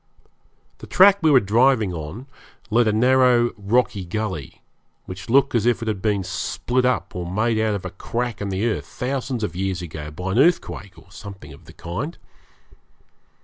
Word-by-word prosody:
The - - -10
track 200 +1 +6
we 160 - +4
were 140 -3 +7
driving 115 -1 +2
on 85 - -7 0.5
led 115 +1 +3
along 105 - +1
a - - +1
narrow 125 -1 +4
rocky 105 -1 0
gully 95 -5 -5 0.4
which 95 +6 -9
looked 135 +2 +4
as 115 -1 +1
if 120 -1 +1
it - - -6
had 105 -4 -2
been 105 -2 0
split 120 +6 -2
up 125 0 -1
or 90 -1 -4
made 110 +3 +1
out 110 -1 +1
of 95 - -6
a 95 - -5
crack 115 +4 -4
in 100 - -3
the 95 +3 -1
earth 115 - -2
thousands 130 -2 -3
of 90 -5 -3
years 95 -1 -2
ago 75 -3 -7
by 90 +5 -5
an 110 - +1
earthquake 130 - +1
or 95 - -18
something 95 -8 -10
of 70 - -16
that - - -16
kind. 125 - -5
110 Hz, 190 wpm, -22 LUFS, 95-125 Hz, 0.5 s, were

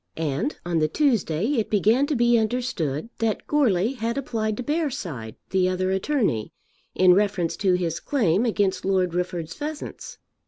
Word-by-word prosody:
And 165 - -2
on 170 -2 0
the 155 - +2
Tuesday 205 - +1
it 215 - -2
began 220 +7 +3
to 300 - 0
be 240 0 +4
understood 225 - -1
that 225 -2 -1
Goarly 235 -7 +2
had 230 +2 -2
applied 220 -5 -2
to 250 - -3
Bearside, 205 - -3 0.2
the 185 -1 +2
other 185 0 0
attorney, 190 - 0 0.4
in 185 -1 +6
reference 195 -3 +1
to 190 -3 +2
his 170 -2 -2
claim 210 - +1
against 205 -5 0
Lord 185 -3 +1
Rufford's 175 -2 -3
pheasants. 300 0 -6
200 Hz, 155 wpm, -24 LUFS, 175-240 Hz, 0.4 s, in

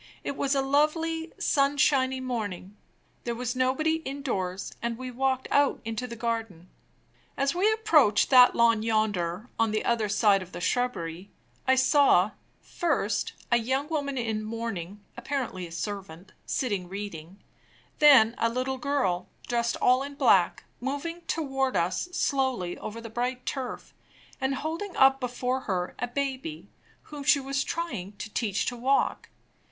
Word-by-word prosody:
It 280 - -3
was 275 0 0
a 270 - +2
lovely, 320 +4 +1
sunshiny 275 -2 +2
morning. 210 -7 -4 0.5
There 235 -1 -2
was 250 +1 -3
nobody 265 +5 +1
indoors, 250 - -4
and 235 -1 -2
we 255 0 -6
walked 260 +1 0
out 285 -1 +3
into 225 +2 -3
the 235 - -7
garden. 225 -7 -4 0.7
As 275 +2 +1
we 385 +5 +3
approached 320 - +3
that 250 -1 +8
lawn 230 -2 +4
yonder, 215 -3 0
on 225 0 +3
the 215 0 -1
other 225 -3 +1
side 205 -1 +4
of 185 -1 -10
the 175 - -5
shrubbery, 185 -6 -2 0.4
I 260 - +5
saw, 260 - +4 0.3
first, 275 - -1 0.2
a 235 - +6
young 265 +5 -1
woman 285 -4 -2
in 220 -3 -2
mourning 215 -4 -5
(apparently 245 -10 -3
a - - -15
servant) 190 -1 -6 0.2
sitting 200 -8 -2
reading; 190 -3 -7 0.6
then 265 -7 +7
a 230 - +2
little 255 +2 -2
girl, 245 -11 0 0.2
dressed 235 -1 0
all 255 +1 +4
in 280 +1 -6
black, 195 -11 +3 0.2
moving 285 +7 -4
toward 270 -4 -1
us 180 - 0
slowly 260 - 0
over 225 +2 -6
the 230 -1 -9
bright 250 +2 -2
turf, 265 -3 -5 0.5
and 265 +1 0
holding 330 +7 -4
up 270 0 +6
before 250 +1 -2
her 180 -1 -1
a 245 - -1
baby, 275 +4 -4 0.3
whom 295 -2 -8
she 285 0 +5
was 275 0 -1
trying 270 - -4
to 210 +1 -8
teach 205 -5 0
to 245 - -2
walk. 260 +3 0
250 Hz, 150 wpm, -27 LUFS, 210-275 Hz, 0.7 s, that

